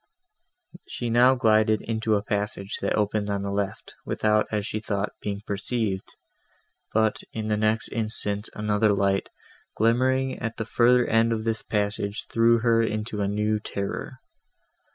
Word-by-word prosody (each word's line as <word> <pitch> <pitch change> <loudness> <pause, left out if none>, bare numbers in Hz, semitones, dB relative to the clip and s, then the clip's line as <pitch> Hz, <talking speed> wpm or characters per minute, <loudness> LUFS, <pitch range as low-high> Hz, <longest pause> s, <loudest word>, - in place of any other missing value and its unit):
She 120 -1 -4
now 125 +3 +6
glided 110 -3 +3
into 110 -1 0
a 100 - 0
passage, 105 -2 -3
that - - 0
opened 105 0 0
on 100 -1 -1
the 100 - -3
left, 100 -1 -3
without, 105 0 +1
as 105 -2 -1
she 110 - -3
thought, 105 -1 -2
being 100 -1 -3
perceived; 100 -1 -3 0.8
but, 110 -1 +1
in 110 -1 -3
the 105 - +2
next 110 +2 0
instant, 110 -2 -3
another 105 0 +2
light, 100 0 +1 0.5
glimmering 130 +4 +2
at 115 0 -4
the 115 - -3
further 120 +2 +4
end 115 +1 +3
of 110 -1 -1
this 110 -1 -1
passage, 100 0 -2
threw 115 0 +4
her 115 -1 +3
into 110 -1 -2
new 105 +1 0
terror. 100 -1 -4
110 Hz, 150 wpm, -25 LUFS, 105-115 Hz, 0.8 s, now